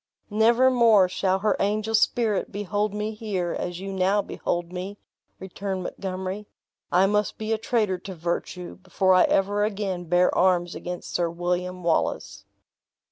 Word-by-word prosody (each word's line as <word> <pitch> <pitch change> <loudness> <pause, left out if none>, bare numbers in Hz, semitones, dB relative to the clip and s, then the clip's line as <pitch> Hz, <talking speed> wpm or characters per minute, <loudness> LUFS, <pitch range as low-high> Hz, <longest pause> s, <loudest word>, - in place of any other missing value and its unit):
"Never 235 +4 +4
more 225 -6 +5
shall 185 +1 0
her 215 - +2
angel 215 +2 0
spirit 220 -1 +1
behold 205 +1 -1
me 210 +1 -3
here, 200 -5 -3
as 175 0 -4
you 195 +1 -5
now 190 +2 +2
behold 175 0 -3
me," 190 +3 -5 0.4
returned 190 0 -5
Montgomery; 190 +2 -5 0.4
"I 185 +2 +5
must 210 0 0
be 220 +1 -2
a 220 - -1
traitor 215 -5 0
to 190 +1 -8
virtue, 175 +1 -4
before 185 0 +1
I 185 - +6
ever 205 +2 +1
again 195 -4 -2
bear 175 +2 +3
arms 175 -1 +2
against 180 0 -6
Sir 170 -1 +1
William 180 +1 -3
Wallace!" 100 -11 -1
190 Hz, 150 wpm, -25 LUFS, 180-210 Hz, 0.4 s, I